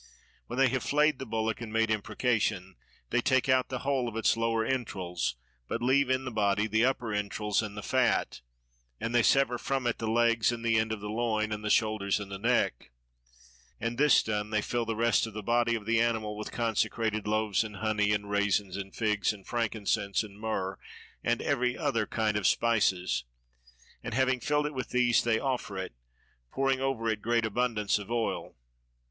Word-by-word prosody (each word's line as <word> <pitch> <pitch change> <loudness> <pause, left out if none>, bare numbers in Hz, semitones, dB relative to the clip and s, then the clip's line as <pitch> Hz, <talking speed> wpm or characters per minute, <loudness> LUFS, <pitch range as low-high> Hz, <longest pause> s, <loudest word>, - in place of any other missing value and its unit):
When - - -6
they 135 -1 +4
have 130 0 -1
flayed 150 +1 +2
the 135 - -6
bullock 110 0 -2
and 115 -2 -6
made 115 0 +1
imprecation, 105 -3 -1 0.4
they 120 - +2
take 130 +1 +2
out 130 -1 +3
the 130 -2 -4
whole 135 -3 +1
of 110 - -11
its 115 - +3
lower 115 0 0
entrails 95 - -2 0.3
but 115 - -3
leave 130 +1 +3
in 130 0 +1
the 125 - -4
body 105 -1 +1
the 110 +1 +1
upper 125 -4 0
entrails 105 +1 -1
and 105 -1 -6
the 105 - -5
fat; - - +1 0.6
and 115 - -3
they 120 - +5
sever 125 -1 +3
from 135 0 -2
it 120 - 0
the 115 - -2
legs 115 0 +3
and 120 -1 -5
the 115 -1 +3
end 110 0 -1
of 110 -2 -4
the 105 - -5
loin 110 -1 0
and 105 0 -4
the 105 - -2
shoulders 105 -2 +2
and 100 -1 -7
the 100 - -5
neck: 115 - 0 0.9
and 115 +2 -3
this 150 -1 +5
done, 105 -1 -2
they 110 0 +1
fill 120 -1 -1
the 115 - -2
rest 115 0 +2
of 110 - -10
the 105 - -5
body 120 +1 +2
of 110 -3 -5
the 115 +1 +2
animal 110 -2 0
with 105 0 -6
consecrated 110 -1 -1
loaves 110 -1 +1
and 105 -1 -8
honey 105 0 +1
and 105 -1 -1
raisins 100 -2 +1
and 95 -1 -7
figs 105 -4 +1
and 100 -3 -11
frankincense 105 -3 -1
and 105 -1 -12
myrrh 95 -4 -2 0.4
and - - 0
every 125 0 0
other 115 -2 0
kind 110 -2 0
of 105 - +2
spices, 95 - +2 0.8
and - - -4
having 130 0 +2
filled 150 +3 0
it 150 - -3
with 130 -2 -4
these 125 -2 +3
they 115 -2 +2
offer 125 -6 -2
it, 95 -8 -5 0.6
pouring 135 -1 +1
over 135 -4 -1
it 110 -2 -1
great 115 +1 +1
abundance 110 -2 0
of 100 - -9
oil. 120 -1 -2
110 Hz, 200 wpm, -29 LUFS, 105-120 Hz, 0.9 s, they